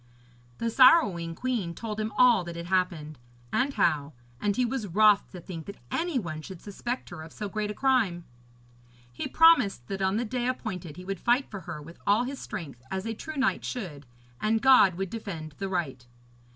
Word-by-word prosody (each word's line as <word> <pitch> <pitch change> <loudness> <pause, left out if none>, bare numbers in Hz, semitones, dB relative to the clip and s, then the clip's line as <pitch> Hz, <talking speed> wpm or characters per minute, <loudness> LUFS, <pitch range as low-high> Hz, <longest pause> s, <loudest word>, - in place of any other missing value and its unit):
The 230 0 -1
sorrowing 205 - +5
queen 220 -9 -2
told 220 -2 -5
him 215 0 -2
all 245 -6 +6
that 170 0 -7
had 170 0 -6
happened, 175 -5 -1 0.3
and 270 +2 +2
how, 145 -1 +1 0.3
and 205 +4 0
he 250 - +2
was 240 -3 -3
wroth 210 +2 +4
to 180 - -9
think 165 -2 -8
that 200 - -8
any 335 -3 -1
one 160 -8 -4
should 185 +2 -9
suspect 240 +6 -5
her 175 -2 -7
of 160 0 -10
so 210 - -5
great 210 +1 -3
a 210 - -4
crime. 220 -11 +1 0.9
He - - -4
promised 290 - +5
that 195 0 -3
on 190 +2 +1
the 240 - -1
day 245 +2 -2
appointed 185 - -4
he 180 - -9
would 195 -1 -4
fight 245 +3 +1
for 200 - -5
her 150 - -7
with 165 +3 -13
all 210 +4 +4
his 270 +2 -5
strength, 160 - -7
as 190 +1 -3
a 225 - -2
true 310 +7 -7
knight 260 -1 +1
should, 155 - -6 0.3
and 220 +1 +2
God 255 -8 +6
would 195 0 -4
defend 175 -9 -6
the 195 - -3
right. 155 -9 -2
200 Hz, 200 wpm, -28 LUFS, 170-240 Hz, 0.9 s, all